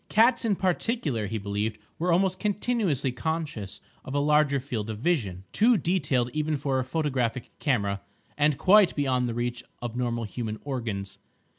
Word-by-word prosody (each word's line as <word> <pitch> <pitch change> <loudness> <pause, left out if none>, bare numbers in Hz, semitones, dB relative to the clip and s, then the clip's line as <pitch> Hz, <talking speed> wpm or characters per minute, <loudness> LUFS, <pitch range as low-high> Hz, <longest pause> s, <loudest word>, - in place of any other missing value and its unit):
Cats, 235 +4 +4
in 210 -3 +2
particular, 180 - 0
he 110 +3 -2
believed, 105 +1 -2 0.2
were 175 +2 +1
almost 185 +2 +2
continuously 205 - 0
conscious 150 - -3 0.2
of 130 - -6
a - - +3
larger 150 -1 +3
field 115 -5 -4
of 110 - -4
vision, 105 - 0
too 230 +2 +4
detailed 140 -8 +1
even 155 0 0
for 135 -1 0
a - - 0
photographic 130 -4 -1
camera, 100 -9 0 0.3
and 150 -1 +2
quite 195 +3 +5
beyond 130 -4 +1
the 115 - -3
reach 120 0 -2 0.2
of 120 -1 -5
normal 120 -2 -1
human 110 0 -4
organs. 105 -8 -4
135 Hz, 160 wpm, -27 LUFS, 115-165 Hz, 0.3 s, quite